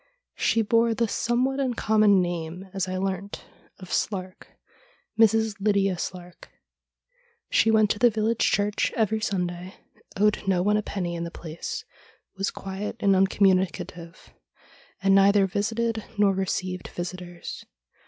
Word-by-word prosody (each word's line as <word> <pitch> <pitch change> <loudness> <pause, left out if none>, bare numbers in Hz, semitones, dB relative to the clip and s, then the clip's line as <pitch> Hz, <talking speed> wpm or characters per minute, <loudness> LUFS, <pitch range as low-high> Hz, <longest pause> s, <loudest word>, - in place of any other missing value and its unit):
She 225 - +2
bore 230 +1 +2
the 230 0 +1
somewhat 250 +5 0
uncommon 215 -6 +3
name, 175 +1 -5
as 195 -1 -1
I 185 0 -3
learnt, 195 +1 -4 0.3
of 185 -2 -12
Slark 185 -3 -3 0.3
— - - -28
Mrs. 220 0 +4
Lydia 200 -2 +2
Slark. 175 0 -7 1.1
She 225 - +4
went 215 -2 +4
to 210 - -2
the 240 - +6
village 220 +1 -1
church 205 0 +1
every 220 -1 +1
Sunday, 180 -3 -3 0.4
owed 210 +1 +2
no 180 -2 +2
one 210 +2 +2
a 210 - +2
penny 180 -4 -4
in 170 0 -4
the 170 - -4
place, 175 - -7 0.5
was 195 +1 -1
quiet 195 +2 -6
and 200 -1 +3
uncommuni 190 -1 +3
cative, 170 +1 -10 0.7
and 195 0 +4
neither 195 0 +5
visited 225 +3 -1
nor 205 -1 +4
received 185 -1 -3
visitors. 175 0 -7
195 Hz, 140 wpm, -25 LUFS, 185-220 Hz, 1.1 s, the